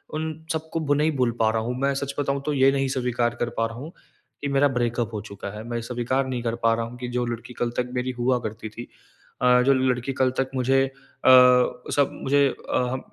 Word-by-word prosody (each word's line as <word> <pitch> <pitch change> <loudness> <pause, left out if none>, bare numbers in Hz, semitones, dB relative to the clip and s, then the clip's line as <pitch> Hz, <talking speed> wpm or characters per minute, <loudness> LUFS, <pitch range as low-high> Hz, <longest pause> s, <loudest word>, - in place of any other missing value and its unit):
उन 160 0 -2 0.2
सबको 160 +1 -3
भू 145 -2 +1
नहीं 150 +2 +2
भूल 125 -2 +2
पा 110 -1 +4
रहा 110 0 0
हूँ। 120 +3 -3
मैं 140 +1 +1
सच 140 0 -3
बताऊँ, 140 -1 -1
तो 150 - 0
ये 135 0 +4
नहीं 135 -1 0
स्वीकार 120 -2 0
कर 120 - 0
पा 115 - +2
रहा 115 +1 -10
हूँ 150 +6 -8 0.5
कि 145 - -2
मेरा 140 +1 +4
ब्रेकअप 120 -1 -1
हो 105 - -3
चुका 100 -2 -8
है। 110 - -7
मैं 120 -1 -2
स्वीकार 125 +3 -1
नहीं 125 -2 -3
कर 115 0 -1
पा 115 0 +4
रहा 115 0 -2
हूँ 120 +2 -9
कि 125 - -4
जो 125 - 0
लड़की 120 +1 -6
कल 120 - -1
तक 125 0 -1
मेरी 125 +1 -1
हुआ 125 +1 +2
करती 110 -1 -6
थी 120 +3 -9 0.5
अ, 125 0 +5
जो 135 +2 +4
लड़की 130 0 0
कल 130 -1 +3
तक 135 0 0
मुझे 135 +1 +3
अ, - - -6 0.4
सब 125 +1 +5
मुझे 140 +1 +4 0.2
अ - - +1
अ, 125 +1 -1
125 Hz, 240 wpm, -24 LUFS, 120-135 Hz, 0.5 s, अ